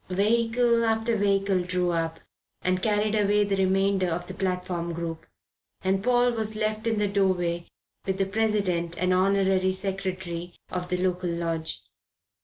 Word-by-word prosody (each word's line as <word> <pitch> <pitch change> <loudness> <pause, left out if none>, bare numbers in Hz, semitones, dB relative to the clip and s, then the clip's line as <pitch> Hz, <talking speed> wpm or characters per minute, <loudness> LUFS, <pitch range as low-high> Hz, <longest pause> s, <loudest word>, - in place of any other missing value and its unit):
Vehicle 230 +4 +2
after 225 +1 +1
vehicle 195 -2 +2
drew 180 0 0
up 165 -1 -2 0.4
and 185 0 +1
carried 210 0 +1
away 205 -1 +3
the 200 -1 0
remainder 195 0 +2
of 175 +1 -2
the 185 - -7
platform 180 -2 -2
group, 165 -1 -5 0.6
and 190 +1 +1
Paul 245 0 +3
was 220 -2 -2
left 215 +1 -1
in 225 -1 +1
the 210 0 +2
doorway 180 -4 0 0.4
with 190 0 0
the 195 - +1
President 195 -5 0
and 185 +1 +2
Honorary 190 0 +3
Secretary 185 -3 -4 0.2
of 180 -1 -3
the 180 - 0
local 180 -1 -1
lodge. 165 -1 -3
190 Hz, 150 wpm, -26 LUFS, 180-210 Hz, 0.6 s, away